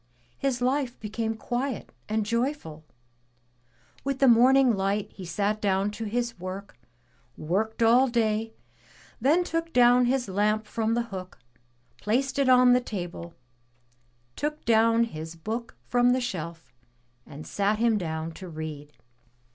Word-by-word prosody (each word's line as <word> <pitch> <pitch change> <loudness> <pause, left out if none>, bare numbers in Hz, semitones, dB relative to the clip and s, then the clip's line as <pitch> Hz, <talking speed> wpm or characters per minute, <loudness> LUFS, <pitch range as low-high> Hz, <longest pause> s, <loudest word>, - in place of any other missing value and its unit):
His 255 -3 -1
life 260 -1 0
became 220 +1 -3
quiet 245 +2 -3 0.2
and 215 0 0
joyful. 235 - -2 1.2
With 275 -1 -2
the 270 - +4
morning 250 +1 +5
light 195 +1 -1
he 190 - -9
sat 205 +5 -1
down 195 0 +1
to 225 +2 -6
his 235 -1 -2
work, 185 +2 -7 0.6
worked 220 +8 -1
all 245 +4 +5
day, 225 -2 0 0.6
then 300 +9 +3
took 330 -1 -3
down 245 -1 +5
his 250 -1 0
lamp 210 +3 0
from 225 +1 -1
the 240 - +1
hook, 185 -1 -7 0.6
placed 265 +6 0
it 275 -2 +3
on 250 -1 +6
the 250 - +3
table, 175 -6 -6 1.0
took 300 +1 -4
down 230 0 +4
his 160 -6 -6
Book 225 +8 -5
from 245 0 +3
the 255 - +1
shelf 170 -8 -6 0.5
and 150 +2 -10
sat 205 +1 0
him 225 -1 +2
down 160 -2 -4
to 180 +2 -10
read. 155 -2 -7
225 Hz, 140 wpm, -26 LUFS, 195-245 Hz, 1.2 s, on